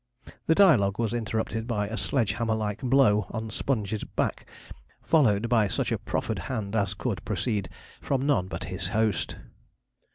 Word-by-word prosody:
The 160 - +4
dialogue 120 - +5
was 115 -1 -1
interrupted 110 -1 -2
by 105 -4 -1
a 110 - -4
sledge 100 +3 +1
hammer 115 0 0
like 105 -2 -3
blow 120 -7 +3
on 110 0 -5
Sponge's 110 -4 -2
back, - - -2 0.6
followed 120 -9 +3
by 115 -3 +3
such - - -1
a - - 0
proffered - - -2
hand 110 -5 -3
as 100 -3 0
could - - -3
proceed 105 -6 -2 0.3
from 135 -1 -1
none 105 -11 +2
but 85 +1 -5
his 95 +1 -4
host. 110 +1 0
110 Hz, 160 wpm, -27 LUFS, 100-120 Hz, 0.6 s, dialogue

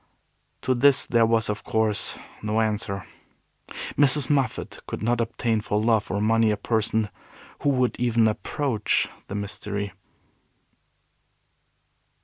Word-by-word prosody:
To 130 - +2
this 135 +2 +5
there 115 -1 +3
was, 115 0 +2
of 105 -1 -3
course, 110 -3 +1 0.2
no 110 +1 0
answer. 105 -3 -1 0.9
Mrs. 145 0 +4
Moffat 135 -3 -1
could - - -5
not 120 +1 +1
obtain 115 -1 -1
for 105 0 -1
love 110 -1 +1
or 100 - -1
money 115 +1 +3
a 105 - 0
person 110 0 0 0.5
who 145 - +2
would 130 -3 +1
even 120 -2 +3
approach 110 +1 -1 0.2
the 100 - -6
Mystery. 100 -1 -4
110 Hz, 125 wpm, -25 LUFS, 105-120 Hz, 0.9 s, this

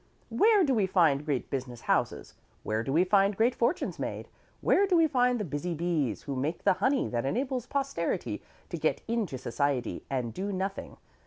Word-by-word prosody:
Where 425 -2 +5
do 275 -5 +2
we 210 -5 +2
find 160 -7 +3
great 145 -4 -2
business 125 -4 -4
houses? - - -1 0.3
Where 110 +1 -1
do 135 - -3
we 165 +6 +4
find 195 +1 +3
great 235 +3 +3
fortunes 240 +8 -1
made? - - -4 0.3
Where 400 +1 +3
do 365 -2 +3
we 330 - +5
find 250 -4 +2
the 210 - -2
busy 160 +3 -3
bees 150 - -1
who 140 - -4
make 145 +6 -2
the - - +5
honey 265 0 +2
that 120 -1 -1
enables 250 - -2
posterity 275 0 -2 0.3
to - - -4
get - - 0
into 225 - -1
Society 130 0 -2
and 125 -4 -2
do 200 +2 -3
nothing? 195 +1 -4
185 Hz, 185 wpm, -29 LUFS, -, 0.3 s, Where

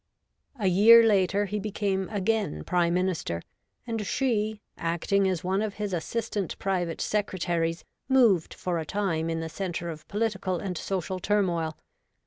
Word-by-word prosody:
A 210 - -3
year 215 +6 +8
later, 200 -2 +3
he 210 +1 -3
became 195 -2 -1
again 205 - -1
Prime 175 - +1
Minister, 180 - -1 0.4
and 225 -3 -2
she, 220 -2 0 0.2
acting 175 +4 +1
as 180 -3 -2
one 190 +2 0
of 215 -2 -3
his 205 -2 -3
assistant 205 +2 -2
private 180 -4 -1
secretaries, 175 -5 -1 0.2
moved 230 -11 +4
for 175 -2 -2
a - - -2
time 165 -3 -1
in 165 0 -2
the 165 - -3
centre 175 0 -4
of 155 -1 -11
political 200 -4 -1
and 185 0 -4
social 185 +1 -3
turmoil. 175 -6 0
190 Hz, 145 wpm, -27 LUFS, 170-210 Hz, 0.4 s, year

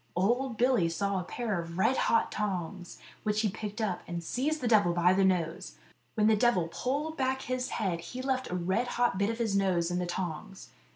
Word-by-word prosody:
Old 235 +6 +1
Billy 240 -9 +3
saw 195 +4 -1
a - - -3
pair 210 -1 -2
of 170 0 -8
red 250 +7 +3
hot 230 - +2
tongs, 185 -3 -4 0.2
which 210 0 0
he 215 - +1
picked 210 +3 -6
up, 200 -5 -1
and 170 -1 -4
seized 290 - -1
the 250 - -2
devil 205 -6 +4
by 175 +1 +4
the 195 +1 +3
nose. 175 -3 0 0.4
When 215 -2 +2
the 220 0 +5
devil 205 -7 +2
pulled 290 - -2
back 265 0 0
his 255 0 -2
head 185 -5 -1
he 250 +10 -7
left 260 -1 -1
a 180 - -2
red 190 +7 0
hot 240 -5 +2
bit 200 +1 +2
of 230 - -2
his 225 -4 0
nose 180 -3 +1
in 175 - 0
the 180 - -2
tongs. 185 +2 -5
200 Hz, 215 wpm, -30 LUFS, 180-240 Hz, 0.4 s, the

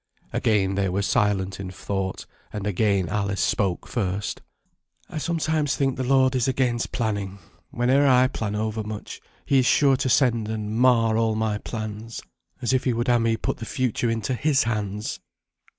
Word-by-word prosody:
Again 100 -3 +2
they 95 -1 0
were 100 +3 -1
silent 95 -4 +1
in 95 -1 -5
thought, 95 +1 -4 0.3
and 105 -2 -5
again 100 -2 +1
Alice 100 +1 -1
spoke 95 -4 0
first. 100 -3 -2 0.7
"I - - -3
sometimes 155 -3 0
think 135 -3 0
the 130 - -2
Lord 130 0 +3
is 125 -1 +1
against 125 -3 0
planning. 100 -5 -2 0.3
Whene'er 130 +4 +2
I 130 -1 +5
plan 110 -5 -3
over 110 +1 -2
much, 105 0 -7 0.2
He 135 - +3
is 125 - +2
sure 140 -2 +4
to 135 0 -1
send 120 -4 +3
and 110 -1 -3
mar 115 -2 +4
all 110 -1 +1
my 110 -1 -1
plans, 110 0 -6 0.4
as 120 - +1
if 130 0 +1
He 125 - +2
would 120 +1 -1
ha' 120 -1 +4
me 115 0 +1
put - - -2
the 115 - -6
future 125 -2 -1
into 115 +2 -1
His 140 +2 +2
hands. 105 -2 -3
115 Hz, 175 wpm, -24 LUFS, 105-130 Hz, 0.7 s, I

